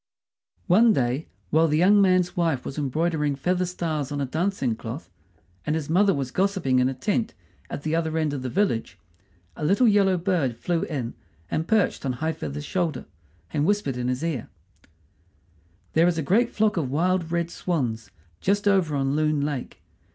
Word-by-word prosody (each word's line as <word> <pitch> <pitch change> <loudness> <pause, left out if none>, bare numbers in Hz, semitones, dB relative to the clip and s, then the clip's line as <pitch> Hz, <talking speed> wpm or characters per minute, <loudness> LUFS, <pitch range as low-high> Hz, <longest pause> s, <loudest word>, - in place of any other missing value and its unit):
One 215 +5 +5
day, 130 0 0 0.2
while 160 +1 +4
the 150 0 +1
young 200 +5 +5
man's 185 -2 +3
wife 165 -7 0
was 140 - -5
embroidering 150 +1 0
feather 180 +6 0
stars 155 -5 -3
on 145 - -2
a 140 - 0
dancing 155 - -1
cloth, 115 +7 -7 0.5
and 150 - -1
his 155 -1 -3
mother 195 +4 +4
was 135 -5 -2
gossiping 185 -9 +1
in 125 +1 +3
a 135 - -4
tent 215 - -1 0.3
at 145 - -6
the 155 - -1
end 160 -2 0
of 140 - -3
the 130 - -3
village, 180 - 0 0.6
a - - -7
little 200 +10 +4
yellow 200 -3 +4
bird 170 - 0
flew 170 +5 -1
in 130 -7 -4 0.4
and 160 +1 -1
perched 220 -3 +1
on 135 -2 -1
High 160 +6 -2
feather's 145 -1 -6
shoulder, 165 -8 -2 0.5
and 145 - +1
whispered 195 -7 +1
in 125 0 -2
his 125 +4 -2
ear: 155 -9 -3 1.4
"There 165 +2 +4
is 175 -2 +1
a 160 - -1
great 225 - +3
flock 215 -2 +1
of 145 -6 -1
wild 170 +3 0
red 170 0 -1
swans 120 - -2 0.3
just 205 +2 +1
over 185 -7 +3
on 135 0 0
Loon 155 -1 +1
Lake. 145 -3 -4
160 Hz, 180 wpm, -25 LUFS, 140-185 Hz, 1.4 s, One